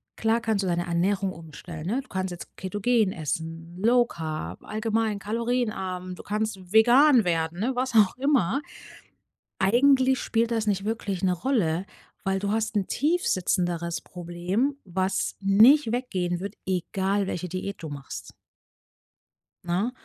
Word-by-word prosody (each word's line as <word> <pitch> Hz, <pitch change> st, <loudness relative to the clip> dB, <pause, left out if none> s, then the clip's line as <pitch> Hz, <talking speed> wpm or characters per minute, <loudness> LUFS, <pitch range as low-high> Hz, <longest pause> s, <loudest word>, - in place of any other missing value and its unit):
klar 225 Hz, +1 st, +1 dB
kannst 220 Hz, -3 st, 0 dB
du 190 Hz, -, -1 dB
deine 175 Hz, 0 st, 0 dB
Ernährung 190 Hz, +3 st, 0 dB
umstellen 160 Hz, 0 st, -9 dB
ne, 245 Hz, +7 st, 0 dB
du 265 Hz, -, -21 dB
kannst 190 Hz, -4 st, -3 dB
jetzt 175 Hz, -, -9 dB
ketogen 205 Hz, +2 st, +1 dB
essen, 165 Hz, +2 st, -5 dB
Low 240 Hz, +1 st, +5 dB
Carb, 155 Hz, -, -6 dB
allgemein 220 Hz, -1 st, -1 dB
kalorienarm. 210 Hz, -5 st, -2 dB
Du -, -, -10 dB
kannst 205 Hz, -3 st, -3 dB
vegan 245 Hz, +3 st, +6 dB
werden, 165 Hz, 0 st, -1 dB
ne? 250 Hz, +5 st, 0 dB
Was 255 Hz, 0 st, -1 dB
auch 210 Hz, -4 st, +5 dB
immer. 270 Hz, -, +2 dB, 1.0 s
Eigentlich 260 Hz, +5 st, +4 dB
spielt 230 Hz, 0 st, 0 dB
das 225 Hz, -2 st, 0 dB
nicht 195 Hz, 0 st, 0 dB
wirklich 205 Hz, -4 st, -3 dB
'ne 185 Hz, -, +3 dB
Rolle, 180 Hz, -5 st, 0 dB, 0.4 s
weil 195 Hz, 0 st, 0 dB
du 200 Hz, +1 st, -2 dB
hast 220 Hz, 0 st, -1 dB
'n 195 Hz, -, +1 dB
tiefsitzenderes 180 Hz, -, 0 dB
Problem, 180 Hz, +10 st, -2 dB
was 185 Hz, +1 st, -1 dB
nicht 225 Hz, +7 st, +6 dB
weggehen 185 Hz, -8 st, -1 dB
wird, 200 Hz, +2 st, -5 dB
egal 190 Hz, +2 st, 0 dB
welche 180 Hz, -1 st, -4 dB
Diät 185 Hz, +2 st, -5 dB
du 160 Hz, -, -4 dB
machst. 140 Hz, -2 st, -8 dB, 1.3 s
Ne, 185 Hz, +8 st, 0 dB
195 Hz, 140 wpm, -26 LUFS, 175-230 Hz, 1.3 s, vegan